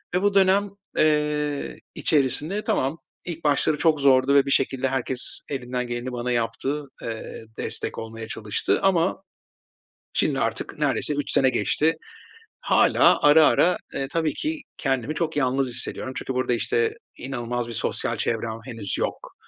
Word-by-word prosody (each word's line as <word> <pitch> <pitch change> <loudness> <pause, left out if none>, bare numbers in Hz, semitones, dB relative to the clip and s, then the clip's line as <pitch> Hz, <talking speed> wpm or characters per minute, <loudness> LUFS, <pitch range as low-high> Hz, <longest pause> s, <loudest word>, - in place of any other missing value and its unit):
ve 180 - +2
bu 205 0 +2
dönem, 195 +1 +4 0.3
eee, 150 -1 +1 0.2
içerisinde 155 +7 +1
tamam, 135 +5 0 0.3
ilk 170 -2 -6
başları 150 +1 +2
çok 155 -1 +2
zordu 135 0 +4
ve 140 - +5
bir 140 - -2
şekilde 135 -1 +1
herkes 130 -1 -2
elinden 125 -2 -3
geleni 120 +1 -4
bana 125 0 -3
yaptı, 120 +5 -1 0.2
eee, 115 0 -6
destek - - -4
olmaya 115 0 -6
çalıştı. 105 -1 -1
Ama 190 0 +2 0.9
şimdi - - +1
artık - - -2
neredeyse 150 - +1
3 145 -1 0
sene 130 - +5
geçti. 130 +7 +1 0.7
Hâlâ - - +4
ara 150 +1 +7
ara, 180 0 +3 0.2
eee, 135 - -2
tabii 160 -2 0
ki 310 0 -3 0.2
kendimi 135 +1 -1
çok 160 -1 -1
yalnız 135 0 +1
hissediyorum 125 +1 -2
çünkü 130 - -3
burada, 125 -1 0
işte, 445 - +1 0.2
inanılmaz 120 -2 -3
bir 115 - -5
sosyal - - -1
çevrem 115 -1 -2
henüz 115 -7 -3
yok. - - -4
135 Hz, 150 wpm, -24 LUFS, 120-155 Hz, 0.9 s, ara